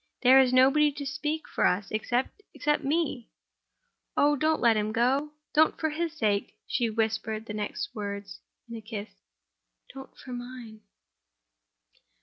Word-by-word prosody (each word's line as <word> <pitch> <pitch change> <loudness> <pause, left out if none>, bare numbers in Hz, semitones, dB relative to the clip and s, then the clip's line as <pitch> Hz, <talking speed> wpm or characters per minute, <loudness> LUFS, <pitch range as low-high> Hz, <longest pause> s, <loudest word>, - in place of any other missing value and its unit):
There 260 +1 +8
is 260 -2 +4
nobody 275 +4 +5
to 285 0 -6
speak 300 +3 -3
for - - -2
us, 195 +3 -1
except—except 260 - -1
me. 280 -5 -1 0.9
Oh, 290 +1 +4
don't 310 +2 +1
let 235 -2 +4
him 215 0 0
go! 265 +6 +1 0.2
Don't 315 +1 +3
for 315 -1 0
his 325 +1 -3
sake—" 205 -5 0
she 235 -2 0
whispered 220 0 -2
the 210 - -6
next 210 -1 -4
words 200 -1 -6 0.3
in 230 - -8
a 225 - -7
kiss—"Don't 220 +4 -12
for 255 - -9
Mine!" 245 -3 -8
250 Hz, 135 wpm, -28 LUFS, 220-295 Hz, 0.9 s, There